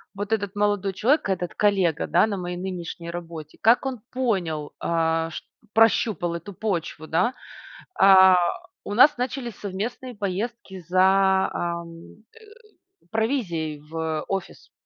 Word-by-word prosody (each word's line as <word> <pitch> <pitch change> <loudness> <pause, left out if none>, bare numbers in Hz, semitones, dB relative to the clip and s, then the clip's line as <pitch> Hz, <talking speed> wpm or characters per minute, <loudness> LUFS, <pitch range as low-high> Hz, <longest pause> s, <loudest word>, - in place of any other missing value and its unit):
вот 205 +2 -5
этот 205 -2 -2
молодой 205 -2 0
человек, 260 - +2
этот 180 -2 -2
коллега, 190 -6 +1
да, - - +4
на 200 -2 -3
моей 175 -1 -4
нынешней 175 -2 -6
работе, 165 -3 -8
как 230 +5 +4
он 260 -4 -3
понял, 180 - -2
а, 165 -1 0
ш - - -7 0.3
прощупал 220 -5 +2
эту 170 +4 -8
почву, 170 -6 -3
да. 180 +10 +1 0.7
А, 190 -1 +8 0.5
у 205 - -4
нас 285 +7 +6
начались 245 -3 -4
совместные 225 +6 -5
поездки 200 0 -4
за, 190 +1 +4
ам, 170 +4 -6
э, 455 - -17 0.7
провизией 190 - -1
в 160 +1 -4
офис. 195 -1 -5
190 Hz, 130 wpm, -24 LUFS, 170-220 Hz, 0.7 s, А